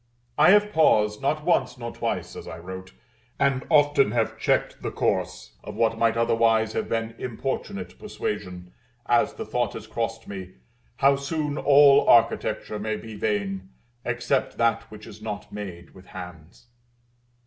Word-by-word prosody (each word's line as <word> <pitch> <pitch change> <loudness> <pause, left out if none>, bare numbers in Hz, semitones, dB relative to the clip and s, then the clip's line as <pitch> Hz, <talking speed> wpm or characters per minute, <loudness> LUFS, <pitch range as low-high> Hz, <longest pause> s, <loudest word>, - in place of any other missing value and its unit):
I 150 +4 +6
have 210 +1 +5
paused, 105 -9 +3
not 150 +2 0
once 130 -8 +1
nor 120 -1 -6
twice, - - -3
as - - -9
I 80 - -7
wrote, 95 +2 -9 0.5
and 135 -2 +1
often 145 -2 +4
have 115 -2 0
checked - - 0
the - - -3
course - - -2
of - - -8
what 115 0 +1
might 115 0 +2
otherwise 115 -1 +2
have - - -2
been 115 0 -2
importunate 135 - -5
persuasion, 90 - -5 0.3
as 120 -1 +2
the - - -6
thought 120 -1 -1
has 110 - -8
crossed 115 0 -4
me, 95 -2 -8 0.4
how 140 0 +4
soon 145 +1 -2
all 140 -1 +6
Architecture 110 -2 +2
may 110 +1 -2
be 110 0 -9
vain, 100 -2 -2 0.3
except 120 +2 -1
that 115 -1 +1
which 105 0 -11
is 105 +1 -12
not 105 -1 -6
made 90 -5 -8
with 95 0 -16
hands. 90 0 -11
115 Hz, 155 wpm, -25 LUFS, 105-135 Hz, 0.5 s, I